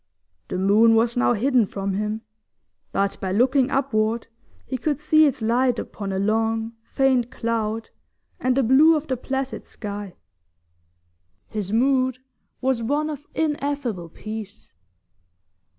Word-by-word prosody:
The 185 - -3
moon 210 +4 +5
was 230 +1 +2
now 245 0 +3
hidden 245 -1 +2
from 195 0 -3
him, 210 +2 -2 0.7
but 195 0 0
by 190 - -2
looking 255 +5 +3
upward 230 -5 0 0.4
he 265 - -4
could 290 +3 -1
see 310 0 +5
its 265 -4 -2
light 245 +2 +2
upon 200 -3 -5
a 190 - -2
long, 225 +2 0
faint 255 0 +1
cloud, 225 -1 -2 0.5
and 255 0 +1
the 270 - +4
blue 285 +7 +6
of 305 0 -2
the 265 - -1
placid 265 +1 -4
sky. 205 -3 -7 1.3
His 205 -3 -4
mood 255 +2 +2 0.4
was 260 -2 +1
one 295 +6 0
of 295 -1 -8
ineffable 285 - -2
peace. 215 - -8
235 Hz, 135 wpm, -23 LUFS, 215-270 Hz, 1.3 s, blue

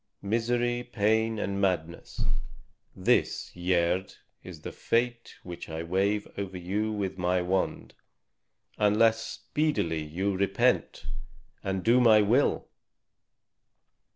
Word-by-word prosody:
Misery, 120 +3 0
pain, 110 -1 +1
and 100 -1 -2
madness 85 -3 -2 0.7
this, - - +1
Gerd, 90 +1 0 0.3
is 85 -4 -10
the - - -6
fate 120 0 -1
which 90 -2 -8
I 80 +1 -4
wave 100 +4 0
over 95 -2 -4
you 100 +5 -2
with 95 -3 -3
my 90 +1 +2
wand, 95 +1 -1 0.9
unless 110 +2 +4
speedily 115 - -1
you 95 +6 -2
repent 95 +1 +1 0.6
and 95 -1 -2
do 120 +2 +5
my 110 -3 +7
will." 120 +8 +2
100 Hz, 105 wpm, -28 LUFS, 90-115 Hz, 0.9 s, my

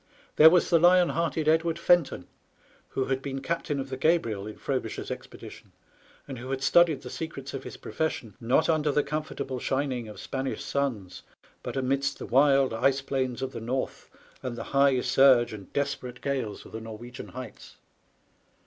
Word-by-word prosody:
There 155 +1 +10
was 180 +2 +3
the 170 - +6
lion 175 +1 +5
hearted 160 -2 -1
Edward 160 +1 +2
Fenton, 175 -5 +2 0.6
who 130 - -2
had 135 0 -1
been 135 -1 -4
captain 145 0 -2
of 135 0 -5
the 130 - -3
Gabriel 115 - +1
in 110 - -8
Frobisher's - - -3
expedition, - - -10 0.5
and 135 -4 -7
who 130 +2 -8
had 135 0 -2
studied 165 -4 +4
the 125 - -7
secrets 140 -4 -6
of 135 - -5
his - - -8
profession, 140 -9 -3
not 125 +7 +2
under 155 -2 +2
the 145 +1 +2
comfortable 140 -4 -4
shining 130 -3 -1
of 105 - -10
Spanish 135 0 -4
suns, 110 -10 -3 0.4
but - - -5
amidst 135 +1 0
the - - -7
wild 135 0 +4
ice 135 +4 +2
plains 130 -2 -2
of 130 - -3
the - - -7
north 130 +4 -3 0.3
and 125 -2 -4
the 115 - -5
high 140 -2 +4
surge 130 -4 +5
and 100 -3 -10
desperate 135 -3 -3
gales 130 -7 -3
of - - -13
the 110 - -6
Norwegian 115 +2 -9
heights. 125 -2 -10
135 Hz, 175 wpm, -27 LUFS, 125-150 Hz, 0.6 s, There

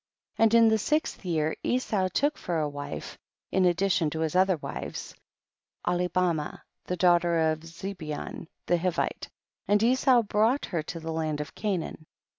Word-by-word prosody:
24. - - +3
And 230 - +7
in - - +6
the 220 - +3
sixth 305 +5 -1
year 160 -3 0
Esau 215 -7 0
took 290 - +1
for 175 -2 -3
a 155 -1 +1
wife, 145 0 -6 0.3
in 190 0 +3
addition 175 -2 +2
to 160 +2 -4
his 160 +1 -1
other 185 -1 +4
wives, - - -6 0.7
Ahlibaraah, 175 -3 0 0.2
the 180 - -3
daughter 170 -2 +3
of 155 - -3
Zebeon 165 -2 -6 0.2
the 175 - +2
Hivite, 175 0 -1 0.4
and 205 +1 +3
Esau 250 0 +4
brought 220 +6 +2
her 170 -4 -2
to 165 +2 -6
the 165 0 -5
land 155 -2 -1
of 150 -1 -5
Canaan. 180 -6 -3
175 Hz, 160 wpm, -28 LUFS, 160-200 Hz, 0.7 s, And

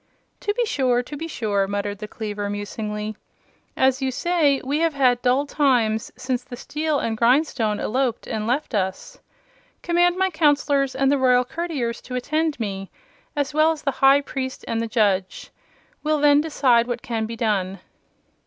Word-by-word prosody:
"To 410 - -1
be 485 0 +1
sure; 255 - +1
to 295 - -8
be 325 +3 -5
sure," 205 -9 -1
muttered 205 0 -3
the 210 - -6
cleaver, 210 -2 -4
musingly. 210 +1 -4 0.6
"As 265 +1 +2
you 265 - 0
say, 295 0 +2
we 280 +3 -1
have 330 -2 +1
had 250 -3 +3
dull 255 +3 +2
times 245 -7 +1
since 255 -1 -3
the 255 -1 -9
steel 300 +4 -2
and 225 -4 -1
grindstone 235 -2 +2
eloped 250 0 -1
and 215 0 -3
left 265 +4 -1
us. 190 -2 -3 0.6
Command 350 +1 +2
my 380 0 +1
Counselors 285 -4 +2
and 270 +1 +2
the 285 - +2
Royal 250 -1 +4
Courtiers 270 -6 -3
to 250 - -7
attend 310 +3 -1
me, 195 -3 -4 0.5
as 290 0 -1
well 310 +1 +4
as 315 - -5
the 275 - +1
High 275 +1 +6
Priest 260 -2 -5
and 225 0 -1
the 230 - -2
Judge. 200 -5 0 0.5
We'll 305 0 +1
then 290 0 +5
decide 255 -6 +2
what 240 -1 -4
can 225 -2 -2
be 230 - -6
done." 195 -4 -1
255 Hz, 170 wpm, -23 LUFS, 220-290 Hz, 0.6 s, High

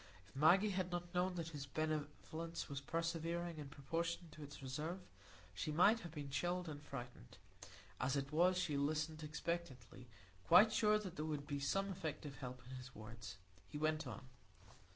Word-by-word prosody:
If 95 - -21
Maggie 185 +9 +6
had 185 -1 0
not 175 0 -3
known 180 +1 +2
that 165 -2 -2
his 145 -3 -5
benevolence 155 +2 -2
was 140 -1 -4
persevering 165 +1 -1
in 145 -2 -6
proportion 165 +4 -2
to 155 - -11
its 145 -1 -8
reserve, 155 +7 -2 0.5
she 90 +12 -2
might 195 +9 +6
have 175 -7 -7
been 145 -3 -5
chilled 175 +4 0
and 145 -2 -5
frightened. 125 - -8 0.6
As 130 +2 +2
it 140 0 -1
was, 180 +4 +5
she 155 -5 +1
listened 155 +2 0
expectantly, 150 -6 -4 0.4
quite 205 +6 +9
sure 215 -1 +5
that 200 -5 -5
there 155 - -1
would 150 -2 -2
be 145 -1 -2
some 195 +8 +1
effective 155 -5 -4
help 125 -2 -6
in 130 0 -6
his 130 +1 -9
words. 110 -3 -8 0.3
He - - -5
went 155 +1 +1
on. 135 - -6
155 Hz, 175 wpm, -40 LUFS, 140-175 Hz, 0.6 s, quite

